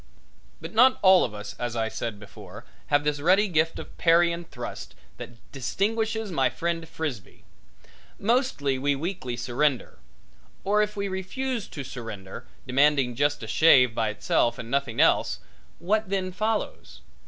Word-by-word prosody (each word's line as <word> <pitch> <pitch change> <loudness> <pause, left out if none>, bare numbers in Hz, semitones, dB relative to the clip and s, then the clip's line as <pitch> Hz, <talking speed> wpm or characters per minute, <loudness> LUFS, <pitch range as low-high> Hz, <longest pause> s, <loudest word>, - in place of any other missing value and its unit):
But - - -8
not 250 +4 +5
all 190 -1 +7
of 105 - -3
us, 105 -1 -8
as 120 -1 -3
I 110 -1 0
said 110 -1 -5
before, 105 -1 -12 0.2
have 145 0 +2
this 150 -1 -1
ready 185 +7 +4
gift 160 -2 +1
of - - -9
parry 170 0 +4
and 170 0 -6
thrust - - -8 0.2
that 120 - -9 0.2
distinguishes 220 - -2
my 135 -6 +2
friend 165 -1 -3
Frisbee. 140 - -6 0.7
Mostly 210 - 0
we 140 +1 +1
weakly 140 -6 -4
surrender. 125 - -1 0.6
Or 210 +2 +2
if 210 0 -1
we 200 -1 -2
refuse 215 +5 -3
to 140 - -7
surrender, 110 -9 -8 0.2
demanding 135 -1 +3
just 145 +1 0
a - - -6
shave 125 -1 +5
by 110 -1 0
itself 120 +2 0
and 115 0 -8
nothing 140 -4 -1
else, - - +3 0.4
what 205 +4 0
then 190 -1 -1
follows? 215 +3 -3
150 Hz, 155 wpm, -26 LUFS, 125-195 Hz, 0.7 s, all